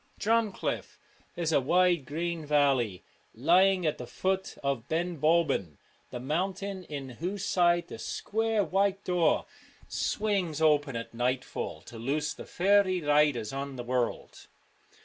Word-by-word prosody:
Drumcliff 220 Hz, -1 st, 0 dB, 0.4 s
is 165 Hz, -2 st, -1 dB
a 145 Hz, -, +3 dB
wide 175 Hz, +1 st, +3 dB
green 170 Hz, +2 st, -3 dB
valley, 135 Hz, -9 st, +2 dB, 0.3 s
lying 180 Hz, +8 st, +4 dB
at 155 Hz, -, 0 dB
the 125 Hz, -, -6 dB
foot 190 Hz, +8 st, -2 dB
of 135 Hz, -4 st, -1 dB
Ben 170 Hz, 0 st, -2 dB
Bulben, 155 Hz, -, +2 dB, 0.3 s
the 125 Hz, -, -6 dB
mountain 185 Hz, +7 st, -2 dB
in 140 Hz, -4 st, -6 dB
whose 190 Hz, +3 st, -2 dB
side 175 Hz, -1 st, +2 dB
the 115 Hz, -, -9 dB
square 220 Hz, -, -1 dB
white 195 Hz, +3 st, +1 dB
door 180 Hz, -2 st, +2 dB, 0.4 s
swings 195 Hz, -8 st, -1 dB
open 150 Hz, -4 st, +3 dB
at 115 Hz, 0 st, -5 dB
nightfall 125 Hz, +2 st, -2 dB
to 115 Hz, -, -10 dB
loose 150 Hz, +6 st, -1 dB
the -, -, -10 dB
faery 190 Hz, 0 st, +3 dB
riders 145 Hz, -6 st, +2 dB
on 135 Hz, 0 st, -4 dB
the 125 Hz, -, -5 dB
world. 125 Hz, -1 st, -3 dB
160 Hz, 135 wpm, -29 LUFS, 135-185 Hz, 0.4 s, lying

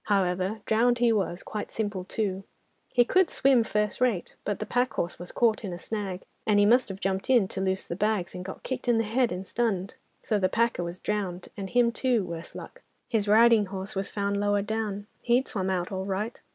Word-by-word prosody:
However, 190 Hz, +1 st, 0 dB
drowned 240 Hz, +2 st, +3 dB
he 235 Hz, -1 st, +3 dB
was, 185 Hz, -4 st, -1 dB
quite 210 Hz, -, -5 dB
simple 205 Hz, -4 st, -3 dB
too. 195 Hz, -2 st, -2 dB, 0.5 s
He 245 Hz, -1 st, +4 dB
could 370 Hz, +5 st, +3 dB
swim 265 Hz, -3 st, +4 dB
first 210 Hz, +1 st, -1 dB
rate, 235 Hz, -8 st, +1 dB
but 205 Hz, -, -2 dB
the -, -, -4 dB
pack 245 Hz, 0 st, 0 dB
horse 175 Hz, -, -2 dB
was 175 Hz, -, -7 dB
caught 230 Hz, -2 st, +2 dB
in 195 Hz, -, -4 dB
a -, -, -5 dB
snag, 195 Hz, -1 st, -4 dB, 0.2 s
and 210 Hz, -1 st, +3 dB
he 205 Hz, -, +5 dB
must 240 Hz, +2 st, +4 dB
have 195 Hz, 0 st, -6 dB
jumped 190 Hz, +2 st, -2 dB
in, 240 Hz, -7 st, +5 dB
to 190 Hz, -, -4 dB
loose 190 Hz, 0 st, -1 dB
the 170 Hz, -, -4 dB
bags, 205 Hz, -2 st, 0 dB
and 180 Hz, -, -6 dB
got 190 Hz, -, -8 dB
kicked 260 Hz, -1 st, -3 dB
on 235 Hz, -, +4 dB
the 225 Hz, -, +2 dB
head 235 Hz, +3 st, +1 dB
and 185 Hz, +2 st, -4 dB
stunned. 200 Hz, -4 st, -1 dB, 0.3 s
So 215 Hz, -, +1 dB
the 185 Hz, -1 st, +2 dB
packer 230 Hz, -5 st, +1 dB
was 170 Hz, +1 st, -5 dB
drowned, 190 Hz, -3 st, -3 dB
and 195 Hz, -3 st, -5 dB
him 240 Hz, +1 st, +3 dB
too, 240 Hz, -2 st, +1 dB
worse 170 Hz, -1 st, -7 dB
luck! -, -, -9 dB, 0.3 s
His 215 Hz, -3 st, 0 dB
riding 220 Hz, 0 st, +6 dB
horse 190 Hz, 0 st, -6 dB
was 195 Hz, 0 st, -2 dB
found 200 Hz, -1 st, -1 dB
lower 205 Hz, 0 st, +1 dB
down—he'd 220 Hz, +4 st, -1 dB
swum 190 Hz, -2 st, -2 dB
out 180 Hz, -1 st, -1 dB
all 190 Hz, 0 st, -3 dB
right. 205 Hz, +4 st, -3 dB
205 Hz, 220 wpm, -27 LUFS, 190-230 Hz, 0.5 s, riding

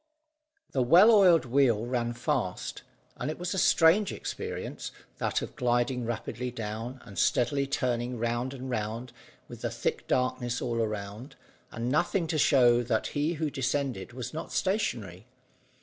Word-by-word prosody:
The 130 Hz, -, +1 dB
well 175 Hz, -, +7 dB
oiled 185 Hz, -8 st, +6 dB
wheel 120 Hz, -3 st, +2 dB
ran 120 Hz, -1 st, -1 dB
fast, 120 Hz, 0 st, -2 dB, 0.4 s
and 125 Hz, -, -3 dB
it 155 Hz, -, -4 dB
was 180 Hz, +2 st, -3 dB
a 190 Hz, -, 0 dB
strange 180 Hz, +6 st, +4 dB
experience -, -, -5 dB, 0.3 s
that -, -, 0 dB
of -, -, -8 dB
gliding 120 Hz, 0 st, 0 dB
rapidly 120 Hz, +1 st, -3 dB
down 115 Hz, +2 st, -5 dB
and 100 Hz, -5 st, -7 dB
steadily 140 Hz, +3 st, +2 dB
turning 125 Hz, -2 st, -1 dB
round 120 Hz, +2 st, -1 dB
and 130 Hz, 0 st, -7 dB
round 115 Hz, +1 st, -3 dB, 0.3 s
with -, -, -10 dB
the -, -, -1 dB
thick -, -, -3 dB
darkness 125 Hz, -1 st, 0 dB
all 115 Hz, -2 st, -1 dB
around, 105 Hz, +3 st, -5 dB, 0.3 s
and 115 Hz, +1 st, -4 dB
nothing 175 Hz, +4 st, +1 dB
to 155 Hz, -, 0 dB
show 120 Hz, -5 st, +5 dB
that 115 Hz, -2 st, 0 dB
he 150 Hz, +3 st, 0 dB
who 155 Hz, -2 st, -2 dB
descended 130 Hz, -6 st, -2 dB
was 125 Hz, +3 st, -6 dB
not 160 Hz, -, -6 dB
stationary. 120 Hz, -, -2 dB
125 Hz, 150 wpm, -29 LUFS, 115-145 Hz, 0.4 s, well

